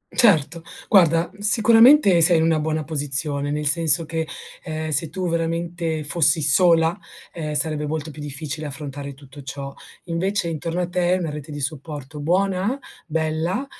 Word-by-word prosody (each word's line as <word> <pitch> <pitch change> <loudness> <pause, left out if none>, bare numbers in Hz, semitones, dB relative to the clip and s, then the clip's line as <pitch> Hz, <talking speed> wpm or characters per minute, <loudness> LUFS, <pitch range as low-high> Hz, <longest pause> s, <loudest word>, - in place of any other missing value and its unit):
Certo, 170 - +3 0.3
guarda, 170 -3 +4
sicuramente 225 - +5
sei 170 0 +6
una 160 -1 +2
buona 155 0 -2
posizione, 145 -1 -2
nel 150 +1 -3
senso 160 +1 +2
che, 160 0 -3 0.4
ehm, 155 -1 -5
se 155 +1 0
tu 185 -1 -4
veramente 165 -1 -2
fossi 160 +1 +3
sola, 165 +3 +5 0.4
ehm, 155 -3 -5
sarebbe 150 -1 0
molto 155 0 -4
più 150 - -11
difficile 150 +1 -5
affrontare 140 -1 -7
tutto 140 0 -14
ciò. 140 0 -7 0.3
Invece, 180 +2 -1
intorno 165 +2 -3
a 175 - -2
te, 180 0 0
hai - - +2
una 165 -4 -3
rete 150 0 -8
di 145 - -6
supporto 145 0 -6
buona, 190 - 0 0.3
bella, 160 - -2
160 Hz, 150 wpm, -22 LUFS, 150-175 Hz, 0.4 s, sei